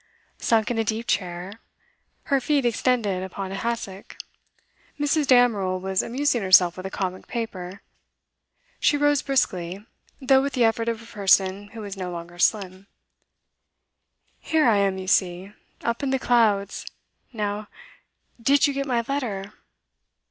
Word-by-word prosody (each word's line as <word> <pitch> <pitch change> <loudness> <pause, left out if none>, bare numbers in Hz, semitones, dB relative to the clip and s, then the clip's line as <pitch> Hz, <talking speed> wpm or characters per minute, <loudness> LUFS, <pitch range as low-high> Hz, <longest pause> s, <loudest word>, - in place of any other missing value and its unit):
Sunk 225 0 +2
in 230 - -1
a - - +2
deep 220 +1 -2
chair, 185 +1 -3 0.6
her 275 -1 +1
feet 285 -1 +1
extended 230 -5 +1
upon 190 +1 -6
a - - -4
hassock, 205 -3 -5 0.8
Mrs. 290 0 +1
Damerel 215 -8 +3
was 190 0 0
amusing 255 0 0
herself 185 -2 +5
with 185 +1 -6
a - - -6
comic 185 -1 -4
paper; 195 -5 -5 1.0
she 290 - +3
rose 290 -1 +3
briskly, 190 -7 -1 0.3
though 265 -1 +4
with 280 0 -2
the 250 -2 +2
effort 230 0 +1
of 230 -1 -4
a - - -14
person 195 -2 +2
who 225 -2 -7
is 200 -1 -6
no 185 -2 -5
longer 175 0 -8
slim. 190 0 0 1.5
'Here 315 -4 +2
I 220 -3 +4
am, 195 -1 +1
you 190 - -6
see! 185 +1 0 0.3
up 235 +2 -1
in 280 - -1
the 265 - +1
clouds. 220 -6 +1 0.4
Now, 210 -2 -3 0.7
did 275 +5 +4
you 285 - +1
get 275 0 -3
my 240 -3 +1
letter? 210 -8 -3
210 Hz, 150 wpm, -24 LUFS, 190-245 Hz, 1.5 s, herself